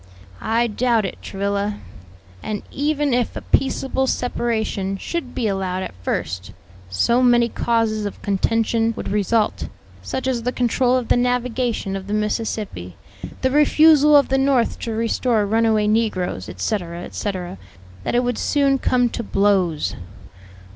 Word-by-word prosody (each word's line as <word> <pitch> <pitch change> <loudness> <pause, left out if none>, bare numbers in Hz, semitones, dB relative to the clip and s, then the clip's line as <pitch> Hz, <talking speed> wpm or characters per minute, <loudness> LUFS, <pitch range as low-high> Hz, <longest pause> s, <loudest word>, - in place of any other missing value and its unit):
"I 230 +2 +1
doubt 230 -1 +1
it, 190 - -6
Travilla; 200 +1 -2 0.6
and 210 -1 -4
even 295 -1 0
if 245 -1 0
a - - -5
peaceable 265 0 0
separation 220 -6 -1
should 270 - -5
be 230 - 0
allowed 190 -2 -2
at - - -6
first, 90 +1 -3 0.4
so 235 - +2
many 240 -1 +4
causes 225 -3 0
of 200 - -8
contention 225 +3 +1
would - - -4
result 210 +2 0 0.3
(such 260 - -4
as 250 -3 0
the 250 +2 -1
control 250 +1 +1
of 245 -3 -4
the - - +4
navigation 245 -4 -1
of 195 0 -6
the 205 - -1
Mississippi, 210 - -3 0.5
the 260 - +1
refusal 300 +1 +5
of 280 - +3
the 270 0 +2
North 270 -3 +2
to 230 - -4
restore 225 0 +1
runaway 220 0 +2
negroes, 210 - 0
etc., 170 - -3
etc.), 185 -3 -5 0.4
that - - -2
it 245 - +3
would 245 -1 -1
soon 275 -2 +2
come 250 -1 +2
to 235 - -4
blows." 195 -7 +1
225 Hz, 145 wpm, -21 LUFS, 200-250 Hz, 0.6 s, refusal